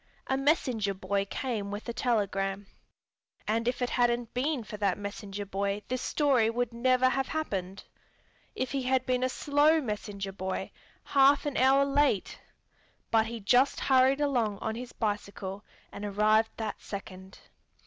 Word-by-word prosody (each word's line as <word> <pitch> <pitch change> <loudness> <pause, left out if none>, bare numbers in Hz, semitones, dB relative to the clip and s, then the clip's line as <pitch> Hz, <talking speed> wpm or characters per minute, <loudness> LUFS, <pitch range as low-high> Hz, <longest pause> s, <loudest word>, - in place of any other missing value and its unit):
A 265 - 0
messenger 255 -8 +1
boy 195 +1 -1
came 215 -1 -3
with 205 +3 -6
a 235 - -3
telegram. 200 -5 -1 0.8
And 230 +2 0
if 250 0 0
it 245 - -1
hadn't 240 -1 +1
been 260 0 -1
for 215 - -8
that 200 -3 +1
messenger 205 0 -6
boy 200 +1 -2
this 255 0 -2
story 265 -7 +2
would 240 0 -1
never 255 +2 +3
have 265 +1 0
happened. 195 - -3 0.7
If 255 -1 -2
he 275 - -1
had 255 0 +1
been 255 -1 0
a 255 - +2
slow 295 +4 +3
messenger 205 -5 -4
boy, 190 0 -4 0.3
half 280 +1 +4
an 290 -2 -2
hour 270 +2 +4
late...but 270 -4 -1
he 230 -1 -6
just 250 +7 +3
hurried 265 +1 +4
along 240 -8 +1
on 220 +2 -3
his 245 +2 -7
bicycle 205 -2 -4 0.3
and 205 - -8
arrived 215 +2 +3
that 220 -2 -4
second. 190 -1 -8
230 Hz, 150 wpm, -29 LUFS, 200-260 Hz, 0.8 s, half